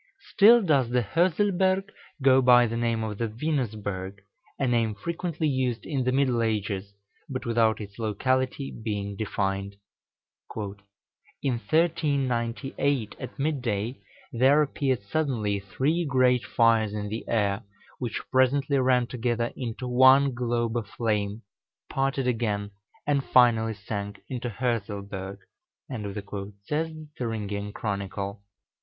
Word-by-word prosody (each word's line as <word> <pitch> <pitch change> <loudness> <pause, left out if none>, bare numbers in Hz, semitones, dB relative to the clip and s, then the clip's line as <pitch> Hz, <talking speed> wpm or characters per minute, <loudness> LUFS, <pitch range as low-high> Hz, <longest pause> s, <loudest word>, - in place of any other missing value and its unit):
Still 230 +3 +7
does 140 -9 +3
the 125 0 +2
Hörselberg 185 - +2 0.3
go 135 -1 +6
by 125 -1 +7
the 115 0 -2
name 115 -1 0
of 105 -2 -4
the 115 - 0
Venusberg, 105 -7 -3 0.4
a 135 - 0
name 115 -3 +1
frequently 170 - -2
used 130 -4 -1
in 135 -5 -1
the 130 - +2
middle 130 -3 +2
ages, 100 -3 -2 0.3
but 130 -1 -4
without 115 -2 +2
its 100 0 -9
locality 130 +5 0
being 100 -2 -4
defined. 100 -1 -2 0.8
"In 100 +5 -6
1398, 135 -5 0
at - - -8
midday, 125 -6 -2 0.3
there 135 +5 +5
appeared 135 -5 -1
suddenly 105 -4 -1
three 135 - 0
great 130 -5 +3
fires 110 -2 +3
in 105 -1 -3
the 110 +2 -4
air, 100 -3 +1 0.4
which 120 -3 -3
presently 135 +2 +3
ran 125 -1 +3
together 120 -1 -1
into 125 0 -5
one 130 +2 +6
globe 120 -1 -1
of 110 -3 -3
flame, 105 0 -2 0.5
parted 135 0 0
again, 105 -4 -1 0.3
and 140 -2 +1
finally 115 -4 +4
sank 100 0 -5
into 125 -1 -3
the 105 - -10
Hörselberg," 100 -5 -3 1.3
says 150 +8 -1
the 155 -1 -10
Thüringian 105 -4 -3
Chronicle. 100 -1 -4
120 Hz, 125 wpm, -27 LUFS, 105-135 Hz, 1.3 s, Still